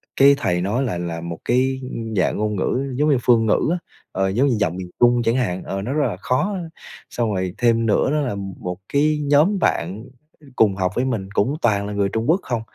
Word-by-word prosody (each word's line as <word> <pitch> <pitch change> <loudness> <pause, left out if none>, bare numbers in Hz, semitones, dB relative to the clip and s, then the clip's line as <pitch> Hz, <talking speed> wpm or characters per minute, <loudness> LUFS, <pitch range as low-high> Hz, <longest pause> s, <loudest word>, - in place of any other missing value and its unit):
cái 140 +1 +6
thầy 90 -10 0
nói 110 +8 0
lại 90 -9 -2
là 85 -1 -4
một 85 -1 -6
cái, 130 +2 +1
ưm, 115 -3 -5
dạng 90 - +1
ngôn 105 0 -1
ngữ 130 +7 -1
giống 150 +3 +2
như 140 - +4
phương 115 -2 +4
ngữ 110 - +2
á, 180 - +1 0.3
ờ, 95 0 0
giống 125 +8 +2
như 125 - +2
giọng 90 -4 0
miền 90 -1 -6
Trung 120 0 +4
chẳng 115 +2 +1
hạn, 95 -8 -1
ờ, 95 0 -4
nó 125 +7 -3
rất 150 -1 +1
là 90 - -4
khó, 180 - -1 0.5
xong 115 -3 -1
rồi 95 -1 -2
thêm 115 -1 +2
nữa 115 +5 +2
đó 150 - +1
là 125 -7 -2 0.2
một 90 0 -5 0.2
cái 150 +1 +2
nhóm 150 +8 +3
bạn 100 - -1 0.5
cùng 100 -4 +3
học 95 -1 -1
với 125 - +1
mình 105 -7 -2
cũng 135 +9 +1
toàn 100 -3 +1
là 105 - -5
người 100 -1 0
Trung 115 +6 -2
Quốc 180 +4 +4
không. 120 -3 -2
115 Hz, 235 wpm, -21 LUFS, 95-130 Hz, 0.5 s, cái